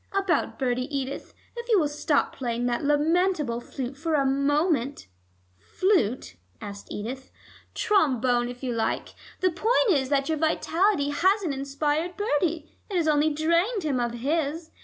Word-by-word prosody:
About 390 -5 0
Bertie, 255 -1 -1
Edith, 275 -1 -4 0.2
if 475 0 -7
you 440 - +5
will 305 - +2
stop 295 0 0
playing 240 -2 -2
that 240 +1 -1
lamentable 295 -3 +1
flute 260 +1 -6
for 320 +3 -1
a 280 -2 +2
moment 280 0 +1 0.3
" 90 0 -39 0.2
"Flute?" 255 - +1 0.2
asked 200 0 -8
Edith. 255 +6 -6 0.5
"Trombone, 255 - +2
if 245 +1 -9
you 250 -2 -1
like. 225 -1 -2 0.3
The 370 -1 +3
point 440 +5 +2
is 265 -6 +1
that 275 -1 +1
your 315 -2 -1
vitality 325 +1 +1
hasn't 375 +1 +2
inspired 290 +5 -2
Bertie; 330 -5 -1
it 395 - -4
has 335 -3 +1
only 300 0 +3
drained 335 +8 +1
him 280 -5 0
of 240 -1 -1
his. 310 +5 -2
290 Hz, 155 wpm, -26 LUFS, 260-340 Hz, 0.5 s, you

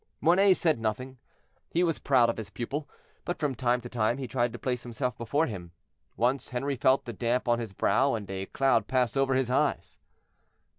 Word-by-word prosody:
Mornay 185 +3 +5
said 160 -8 +1
nothing; 125 +4 -3 0.5
he 175 - +1
was 165 -3 0
proud 130 -4 +4
of - - -11
his 110 -3 -6
pupil, 140 +7 -5 0.3
but 175 - -3
from 150 -4 -1
time 125 0 +1
to 120 - -7
time 120 0 0
he 135 -2 -4
tried 120 0 0
to 120 - -7
place 125 +1 -2
himself 120 0 -3
before 140 +7 0
him. 90 - -7 0.4
Once 125 +3 0
Henri 135 +3 -2
felt 130 +2 +2
the 120 - -5
damp 120 +4 -1
on 120 0 +2
his 115 -4 -5
brow, 115 +8 +2
and 105 -3 -5
a 95 0 -4
cloud 130 -5 +2
pass 125 -3 +1
over 135 -1 +2
his 130 -2 0
eyes. - - 0
125 Hz, 200 wpm, -28 LUFS, 115-135 Hz, 0.5 s, Mornay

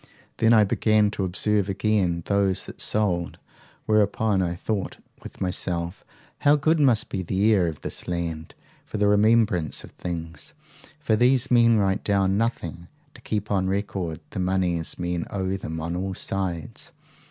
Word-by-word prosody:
Then 115 0 +3
I 110 -2 +6
began 105 +1 +2
to 100 - -3
observe 100 +2 +1
again 95 -4 0
those 100 -2 +1
that - - -9
sold; 90 -5 -1 0.5
whereupon 105 -1 +2
I 85 -1 -1
thought 100 +2 -3 0.2
with - - -11
myself, 90 -1 -3 0.4
How 145 +1 +5
good 155 +3 +2
must 125 -7 +3
be 95 - -3
the 100 +5 +2
air 95 -4 +3
of 80 -3 -5
this - - -5
land 85 -2 -4 0.3
for - - -6
the 105 0 +2
remembrance 105 - +2
of - - -12
things! 80 -3 -7 0.4
for 140 -8 +1
these 125 +3 +3
men 115 -2 +5
write 95 -1 +1
down 100 -1 +2
nothing 90 -6 -2 0.3
to - - -15
keep 105 -1 -3
on 95 -2 +1
record 95 -4 -2
the 100 - -5
moneys 90 -3 0
men 90 -1 -3
owe 95 -1 -2
them 80 -4 -5
on 85 +2 -3
all 95 +1 -3
sides. 90 -6 -4
95 Hz, 160 wpm, -24 LUFS, 85-105 Hz, 0.5 s, I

